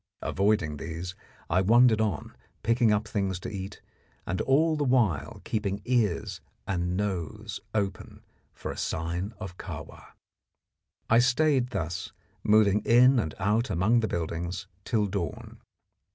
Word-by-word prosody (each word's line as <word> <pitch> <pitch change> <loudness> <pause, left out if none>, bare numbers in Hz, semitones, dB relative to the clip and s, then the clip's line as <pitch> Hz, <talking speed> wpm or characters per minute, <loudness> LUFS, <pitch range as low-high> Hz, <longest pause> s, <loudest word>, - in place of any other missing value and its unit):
Avoiding 100 -6 +1
these, 85 +5 -5 0.3
I 90 +3 +2
wandered 115 +2 +5
on, 105 -8 -2 0.3
picking 115 -1 +3
up 105 +1 +1
things 95 -4 -1
to - - -5
eat, 100 0 -7 0.4
and 95 - -1
all 155 +4 +3
the 150 - 0
while 115 - +1
keeping 100 -2 -2
ears 115 -8 0 0.2
and 90 -1 -1
nose 105 +2 -3 0.2
open 100 -4 -3 0.3
for - - -6
a - - -8
sign 85 +5 -2
of 95 -4 -8
Kahwa. - - -9 0.9
I 115 - +5
stayed 125 +1 +3
thus, 90 -5 -4 0.3
moving 105 -1 +4
in 125 +4 +6
and 80 -8 -2
out 110 +5 +1
among 105 +8 +3
the 110 - 0
buildings, 85 0 -3 0.2
till 110 -3 +1
dawn. 95 -3 -5
105 Hz, 135 wpm, -28 LUFS, 90-115 Hz, 0.9 s, in